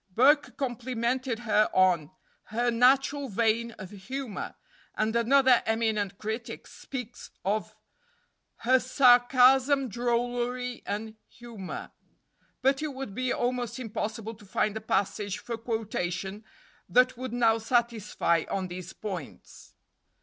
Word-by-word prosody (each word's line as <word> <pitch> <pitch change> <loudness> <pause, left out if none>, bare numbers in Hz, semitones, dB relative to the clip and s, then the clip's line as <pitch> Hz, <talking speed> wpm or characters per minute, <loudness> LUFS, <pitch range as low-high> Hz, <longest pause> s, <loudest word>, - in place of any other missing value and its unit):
Burke 275 +9 +3
complimented 250 -1 -2
her 215 -2 +3
on 180 -5 +3 0.4
"her 240 +2 0
natural 270 +3 +3
vein 230 +2 +1
of 190 -4 -10
humor," 225 +3 -6 0.4
and 215 +1 0
another 255 +1 +5
eminent 220 -3 0
critic 220 +3 -5
speaks 250 -3 -8 0.2
of 215 +2 -1 0.9
"her 260 +2 +5
sarcasm, 255 +1 +5
drollery, 245 +2 -1
and 215 +2 -4
humor;" 230 -6 -8 0.7
but 270 +1 +3
it 300 -3 -4
would 265 -6 -6
be 255 +3 -1
almost 245 -1 -1
impossible 225 -2 -4
to 215 -1 -16
find 205 +1 -1
a 220 - -4
passage 200 -1 -1
for 235 - -5
quotation 210 -3 -3 0.5
that 250 +7 +4
would 255 0 -6
now 230 -2 +3
satisfy 220 -7 +1
on 190 -2 -2
these 180 0 -7
points. 185 -9 -8
235 Hz, 115 wpm, -28 LUFS, 210-250 Hz, 0.9 s, another